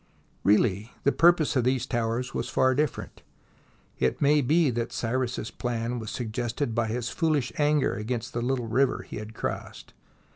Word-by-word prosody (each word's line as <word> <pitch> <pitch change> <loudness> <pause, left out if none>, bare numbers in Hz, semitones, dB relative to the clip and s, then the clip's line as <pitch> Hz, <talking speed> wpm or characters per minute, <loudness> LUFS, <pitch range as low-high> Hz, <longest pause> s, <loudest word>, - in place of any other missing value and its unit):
Really 105 +1 +2
the 140 - +4
purpose 170 -2 +4
of 130 - +3
these 130 0 +1
towers 120 0 -2
was - - -3
far 130 0 +3
different. 145 0 -2 0.8
It 65 -1 +1
may 145 +1 +4
be 150 +2 +3
that 115 0 -2
Cyrus's 120 -1 -2
plan 120 +1 -3
was 110 -2 -6
suggested 120 +2 -3
by 115 -1 0
his 120 +2 -2
foolish 155 -6 0
anger 150 -1 +3
against 115 +2 -4
the 120 - -2
little 125 0 -1
river 130 +4 +1
he - - -8
had 110 +1 -8
crossed. - - -5
120 Hz, 160 wpm, -27 LUFS, 115-135 Hz, 0.8 s, the